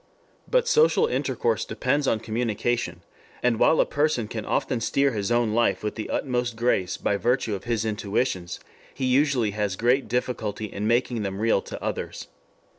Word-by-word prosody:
But - - +2
social 465 -1 +4
intercourse 470 0 0
depends 140 +2 0
on 110 - +1
communication, 115 -5 -2 0.4
and 120 -2 +2
while 160 - +4
a - - +5
person 145 -6 0
can 110 -1 -5
often 120 -3 0
steer 140 +4 +2
his 105 -1 -2
own 120 -2 +2
life 120 -1 +1
with 105 - -2
the 110 - -6
utmost 125 -3 -1
grace 110 -6 0
by 100 - 0
virtue 120 0 0
of 95 - -5
his 115 -2 -1
intuitions, 105 -3 -2 0.4
he 130 - -2
usually 130 -4 +2
has 105 -2 -1
great 125 +6 +2
difficulty 110 -3 -2
in 105 0 -4
making 120 0 +1
them 95 -1 -3
real 110 -3 +2
to - - -8
others. - - -4
115 Hz, 170 wpm, -25 LUFS, 105-130 Hz, 0.4 s, a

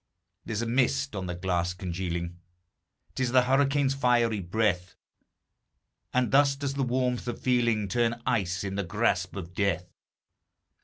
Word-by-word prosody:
There's 110 0 -2
a - - -2
mist 130 +2 +1
on 95 -2 -3
the 90 - -3
glass 90 -1 -1
congealing, 85 -1 -4 0.7
'T - - -4
is 125 -1 0
the 130 -1 +6
hurricane's 135 +1 +2
fiery 120 -5 +2
breath; 90 -1 -1 1.2
And 125 -3 +1
thus 140 0 +5
does 140 -1 -3
the 140 - -2
warmth 125 -1 0
of 120 - -3
feeling 120 -4 +1
Turn 120 +1 0
ice 95 -7 0
in 95 -1 -3
the 100 +1 -1
grasp 90 -1 0
of 90 -3 -7
Death. 90 -3 -1
115 Hz, 150 wpm, -28 LUFS, 90-125 Hz, 1.2 s, the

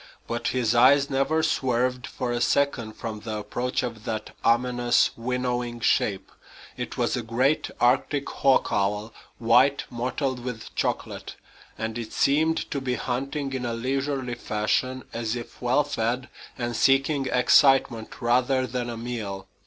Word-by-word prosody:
But 120 0 -3
his 120 -3 +1
eyes 135 +4 +5
never 135 +4 +1
swerved 125 -3 0
for 125 -1 -3
a 120 0 -1
second 125 -7 +1
from 110 -1 -6
the 110 0 -5
approach 120 +5 -2
of 115 -3 -5
that 110 -1 -4
ominous, 120 +1 +3
winnowing 125 0 -2
shape. 100 -4 +1 0.4
It - - -5
was - - +1
a 125 - -2
great 125 +6 +1
Arctic 135 +3 +2
hawk 135 -1 +2
owl, 105 +1 -1 0.2
white 125 +5 +4
mottled 125 +1 -2
with 125 -3 -6
chocolate; - - -3 0.4
and 110 +1 -3
it 115 -2 -7
seemed 160 +3 +2
to 140 - -2
be 125 -1 -1
hunting 135 +3 -3
in 130 -1 -3
a 120 -1 -2
leisurely 135 +1 -2
fashion, 120 +3 -1
as 115 0 -2
if 120 -1 -8
well 130 +4 +3
fed 125 -1 -2 0.3
and 120 -2 -3
seeking 135 +2 +3
excitement 125 -4 +3
rather 125 +2 +2
than 120 0 -3
a 115 - -5
meal. 110 -5 -5
125 Hz, 145 wpm, -25 LUFS, 115-135 Hz, 0.4 s, eyes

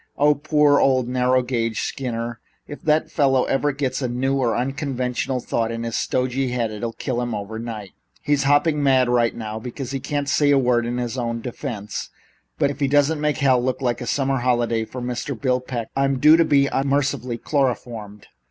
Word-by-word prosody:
Ah, 150 +1 +5
poor 150 0 +3
old 130 -2 +3
narrow 125 0 +2
gauge 115 -3 -1
Skinner! 120 -3 -4 0.3
If 145 - -9
that 155 0 +1
fellow 135 -4 +3
ever 145 +2 +1
gets 135 -1 -2
a 130 - 0
new 130 +3 0
or 125 -4 +1
unconventional 130 -1 -2
thought 115 -1 -1
in 115 0 -4
his 115 -1 -3
stodgy 130 +1 0
head, 120 -3 -1
it'll 115 +2 -4
kill 125 -1 -3
him 120 -2 -2
overnight. 110 0 -6 0.3
He's 145 -2 +1
hopping 145 +2 +3
mad 130 -3 +3
right 120 -1 +2
now, 110 -1 -5
because 125 +3 -6
he 135 - -2
can't 145 +2 -3
say 145 +1 +3
a 140 - +5
word 120 -2 +2
in 120 +1 -2
his 125 +1 -3
own 115 -1 -2
defense, 115 -4 -5 0.5
but 140 - +2
if - - -9
he 140 - +2
doesn't 145 +2 +2
make 150 -1 +1
hell 130 -4 +3
look 130 0 -1
like 125 -2 -1
a 120 - -5
summer 135 -1 0
holiday 120 -2 +1
for 125 +3 -7
Mr. 125 +1 -4
Bill 130 -2 +1
Peck, 125 -3 -5
I'm 135 0 +1
due 150 +4 +7
to 165 0 +4
be 140 -2 +3 0.2
mercifully 135 -3 0
chloroformed. 120 -7 -2
125 Hz, 195 wpm, -22 LUFS, 120-140 Hz, 0.5 s, due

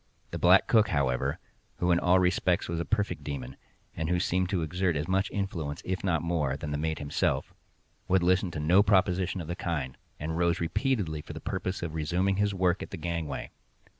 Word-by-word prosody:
The - - -4
black 90 +2 +6
cook, 110 -2 +4
however 65 -2 0 0.4
(who 90 0 +1
in 85 - +4
all 90 +1 +4
respects 90 0 +2
was 85 0 -2
a 85 - -2
perfect 100 -5 -1
demon, 65 -3 -5 0.4
and 80 -1 -2
who 90 0 +2
seemed 90 +1 0
to 90 -4 0
exert 90 +2 0
as 75 +2 -2
much 95 +2 +1
influence, 85 -7 -3
if 95 0 -2
not 85 -5 +1
more, 75 -6 0
than 75 +1 -5
the 75 - -1
mate 80 0 -1
himself), 70 -2 -1 0.5
would 95 -1 +3
listen 90 +1 +3
to 80 - -5
no 85 +6 +5
proposition 95 -2 +2
of 80 - -7
the 85 - -3
kind, 75 -8 -3 0.2
and 80 +2 -3
rose 85 0 +2
repeatedly 85 - -1
for - - -9
the - - -7
purpose 95 -1 -3
of 80 -2 -4
resuming 90 +5 0
his 105 0 +2
work 90 -1 +1
at - - -6
the - - -6
gangway. 85 -2 -4
85 Hz, 205 wpm, -29 LUFS, 80-95 Hz, 0.5 s, black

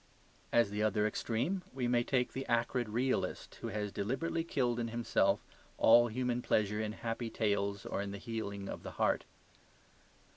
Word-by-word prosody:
As 115 -4 +4
the 105 +1 -2
other 105 0 +2
extreme, 120 - -1
we 125 -2 0
may 120 0 +3
take 125 -1 0
the 135 - -3
acrid 120 0 +1
realist, 125 +4 -1
who - - -3
has 105 0 -3
deliberately 135 +12 -1
killed 125 -7 0
in 115 - -1
himself 110 -4 +1 0.3
all 120 +1 +7
human 125 +1 -1
pleasure 105 -2 +1
in 110 -1 -2
happy 115 +1 -3
tales 100 -3 0
or - - -2
in 100 - -3
the 100 - -5
healing 100 -3 -4
of - - -5
the - - -7
heart. - - +2
115 Hz, 170 wpm, -34 LUFS, 105-125 Hz, 0.3 s, all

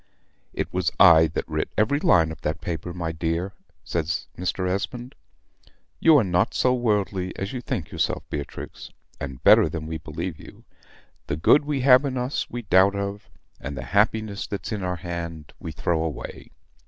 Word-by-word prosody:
"It - - -4
was 90 -3 +1
I 80 -4 +8
that 75 - -4
writ 75 -1 -2
every 110 +7 +2
line 85 - +4
of 80 - -9
that 75 +2 -2
paper, 90 0 -4
my 85 -2 -3
dear," 85 +4 -2 0.3
says 85 -1 -2
Mr. 90 +1 -2
Esmond. 120 +7 -3 0.9
"You 160 -2 +6
are 130 - +4
not 90 -2 +1
so 125 - +3
worldly 105 -6 -1
as 100 +4 -4
you 125 - -4
think 85 -9 -4
yourself, - - -1
Beatrix, 70 -1 -6 0.3
and 65 -2 -7
better - - +7
than 80 -2 -5
we 80 0 -4
believe 80 +2 -5
you. - - -14 0.6
The 70 - -2
good 145 - +5
we 145 -3 -1
have 130 +1 +7
in 135 -2 -2
us 125 +3 -2
we 120 0 -5
doubt 95 0 +4
of; 100 +1 -4 0.3
and 70 0 -6
the 65 - -4
happiness 105 0 +1
that's 100 - -5
to 105 -3 -3
our 90 -1 -1
hand 85 -3 -6
we 80 - -6
throw 80 +2 -1
away. 80 -4 -6
90 Hz, 180 wpm, -24 LUFS, 80-105 Hz, 0.9 s, I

